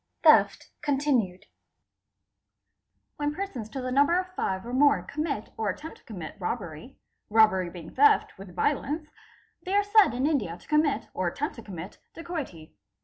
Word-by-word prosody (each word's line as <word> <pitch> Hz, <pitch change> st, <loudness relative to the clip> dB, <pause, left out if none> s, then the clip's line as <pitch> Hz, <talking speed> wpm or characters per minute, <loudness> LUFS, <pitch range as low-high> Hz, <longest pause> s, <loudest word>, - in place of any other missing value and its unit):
Section -, -, +5 dB, 0.3 s
vii.—Dacoity. 230 Hz, -11 st, 0 dB, 1.7 s
When 295 Hz, 0 st, -1 dB
persons 285 Hz, -, -5 dB
to 265 Hz, +4 st, -5 dB
the 255 Hz, 0 st, -3 dB
number 285 Hz, +6 st, +4 dB
of 365 Hz, 0 st, -3 dB
five 190 Hz, -, -2 dB
or 240 Hz, -, -6 dB
more 285 Hz, +2 st, +4 dB
commit 290 Hz, -6 st, -3 dB
or 220 Hz, -2 st, -1 dB
attempt 295 Hz, -, -6 dB
to -, -, -28 dB
comimit 185 Hz, 0 st, -8 dB
robbery, 185 Hz, -, -5 dB, 0.3 s
robbery 210 Hz, -5 st, +4 dB
being 170 Hz, -2 st, -10 dB
theft 435 Hz, 0 st, +4 dB
with 190 Hz, -2 st, -12 dB
violence, 300 Hz, -, -1 dB, 0.5 s
they 380 Hz, +2 st, -2 dB
are 410 Hz, -, +4 dB
said 410 Hz, -, +5 dB
in 255 Hz, +2 st, 0 dB
India 230 Hz, -, 0 dB
to -, -, -20 dB
commit 300 Hz, -2 st, +1 dB
or 185 Hz, -, -1 dB
attempt 285 Hz, -, -2 dB
to -, -, -7 dB
commit 185 Hz, -3 st, -9 dB, 0.2 s
dacoity. 305 Hz, -, -6 dB
255 Hz, 155 wpm, -27 LUFS, 190-305 Hz, 1.7 s, Section